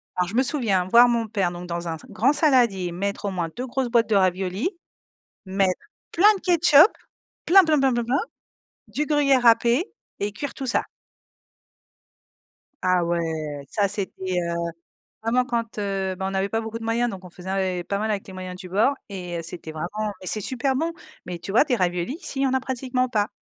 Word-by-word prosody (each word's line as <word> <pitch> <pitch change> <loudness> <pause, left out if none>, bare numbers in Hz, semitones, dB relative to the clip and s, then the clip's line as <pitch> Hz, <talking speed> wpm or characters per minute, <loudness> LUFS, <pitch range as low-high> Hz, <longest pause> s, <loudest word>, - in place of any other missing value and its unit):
Alors 180 -1 0
je 200 - -6
me 255 - +4
souviens 225 -10 +1
voir 235 +6 +7
mon 230 -2 0
père 200 -5 0
donc 175 0 -7
dans 170 0 -4
un 165 -1 -3
z - - -16
grand 265 +6 +2
saladier, 245 - +3
mettre 200 +4 -3
au 200 - -1
moins 175 -3 -2
2 250 +2 -4
grosses 260 0 -2
boîtes 230 -2 +3
de 215 - +3
raviolis, 190 - +1 0.8
mettre 190 -1 +1 0.3
plein 410 +5 +6
de 390 - -6
ketchup, 345 0 +6 0.6
plein 385 +2 +8
plein 310 -2 +3
plein 270 -1 +3
plein 240 -1 0
plein, 255 +5 +1 0.7
du 270 +9 -2
gruyère 280 -4 +3
râpé 235 +5 +4 0.3
et 205 +1 -2
cuire 275 +7 -5
tout 270 - -5
ça. 250 - +1 2.0
Ah 180 -1 +3
ouais, 160 -4 -3
ça 205 -2 +2
c'était, 190 -2 -4
heu, 170 0 -2 0.7
vraiment 245 +3 +1
quand 230 -2 -3
ben, 195 -2 -2
on 190 0 -2
avait 195 +1 0
pas 225 - 0
beaucoup 225 0 -5
de 225 - -9
moyens, 235 +2 +1
donc 190 -4 -7
on 180 - -11
faisait 180 +1 -11
ave 185 -2 -1
pas 200 - -2
mal 215 +1 -1
avec 205 -2 -2
les 190 - -10
moyens 185 -1 -6
du 185 -1 -9
bord 210 +9 +3 0.2
et 180 -4 -5
heu, - - -2
c'était 165 -1 -8
vraiment 205 +7 -3
mais 185 - -10
c'est 215 +3 0
super 265 +4 -1
bon, 325 +4 -1 0.3
mais 175 -1 -6
tu 185 - -7
vois? 225 +8 +5
Des 265 -5 +1
raviolis, 180 +2 -1
ici 270 - -5
il - - +2
y - - +3
en 265 - 0
a 265 - +2
pratiquement 255 -1 -1
pas. 210 -4 0
210 Hz, 210 wpm, -24 LUFS, 185-255 Hz, 2.0 s, plein